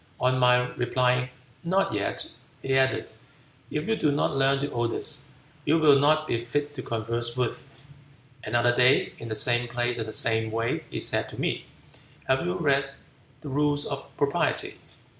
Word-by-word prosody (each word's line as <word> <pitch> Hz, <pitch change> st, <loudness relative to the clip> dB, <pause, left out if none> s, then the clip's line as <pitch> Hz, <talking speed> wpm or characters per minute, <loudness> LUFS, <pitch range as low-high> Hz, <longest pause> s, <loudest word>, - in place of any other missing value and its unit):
On 130 Hz, +1 st, +2 dB
my 125 Hz, 0 st, +4 dB
replying, 125 Hz, +1 st, +1 dB, 0.3 s
'Not 195 Hz, +3 st, +1 dB
yet,' -, -, -2 dB, 0.3 s
he 135 Hz, 0 st, +1 dB
added, 130 Hz, 0 st, +1 dB, 0.6 s
'If 150 Hz, +1 st, -3 dB
you 225 Hz, -, +2 dB
do 150 Hz, -, +1 dB
not 145 Hz, -1 st, 0 dB
learn 135 Hz, 0 st, +3 dB
the 140 Hz, +1 st, -3 dB
Odes, 120 Hz, -2 st, -2 dB, 0.4 s
you 160 Hz, -, +3 dB
will 150 Hz, -3 st, +6 dB
not 155 Hz, +2 st, +3 dB
be 115 Hz, -5 st, -1 dB
fit 145 Hz, +4 st, -2 dB
to 135 Hz, -, -5 dB
converse 115 Hz, +1 st, -3 dB
with.' 125 Hz, -2 st, -1 dB, 0.8 s
Another 120 Hz, +2 st, +2 dB
day, 125 Hz, +2 st, +4 dB
in 115 Hz, -, -7 dB
the 110 Hz, -, -3 dB
same 120 Hz, +2 st, +1 dB
place 120 Hz, 0 st, -1 dB
and 110 Hz, -, -3 dB
the -, -, -5 dB
same 110 Hz, 0 st, +1 dB
way, 115 Hz, +1 st, -2 dB
he -, -, -4 dB
said -, -, 0 dB
to -, -, -10 dB
me, -, -, -1 dB, 0.6 s
'Have 130 Hz, 0 st, +2 dB
you 180 Hz, +1 st, -1 dB
read 140 Hz, -4 st, +1 dB, 0.5 s
the 150 Hz, -, -7 dB
rules 145 Hz, +1 st, +1 dB
of -, -, -5 dB
Propriety?' -, -, 0 dB
130 Hz, 170 wpm, -26 LUFS, 120-145 Hz, 0.8 s, will